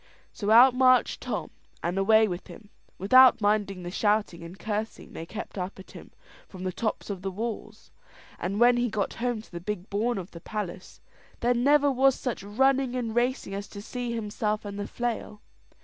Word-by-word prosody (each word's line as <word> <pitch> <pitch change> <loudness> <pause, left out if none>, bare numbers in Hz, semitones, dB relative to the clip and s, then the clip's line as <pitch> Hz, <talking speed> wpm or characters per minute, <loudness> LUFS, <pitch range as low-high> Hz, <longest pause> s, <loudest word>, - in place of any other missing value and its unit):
So 205 - -3
out 240 +4 +8
marched 255 0 +3
Tom, - - -4 0.3
and 175 +1 -1
away 220 +2 +5
with 175 -1 -5
him, 210 - -13 0.3
without 255 +7 +6
minding 205 -3 0
the 175 - -5
shouting 205 -4 0
and 170 +3 -10
cursing 215 +1 -4
they 165 - -7
kept 210 - -7
up 180 +2 -5
at 190 - -13
him - - -12 0.4
from 185 -1 -10
the 185 - -1
tops 215 +2 -3
of 190 -2 -6
the 195 - -3
walls; 215 +1 -6 0.5
and 195 +4 -2
when 240 +1 +5
he 240 0 +1
got 205 -2 -2
home 235 -2 -2
to - - -20
the 170 -1 -7
big 195 0 -5
bawn 225 +4 0
of 185 -1 -6
the 170 - -11
palace, 190 -3 -6 0.4
there 245 +1 +3
never 285 +4 +4
was 270 0 +3
such 250 -6 -3
running 260 +5 +1
and 235 -3 -2
racing 240 -3 0
as 200 +1 -5
to 200 - -10
see 240 +3 -5
himself 215 -1 -2
and 200 0 -6
the 205 - -4
flail. 235 -3 -4
215 Hz, 195 wpm, -27 LUFS, 195-240 Hz, 0.5 s, out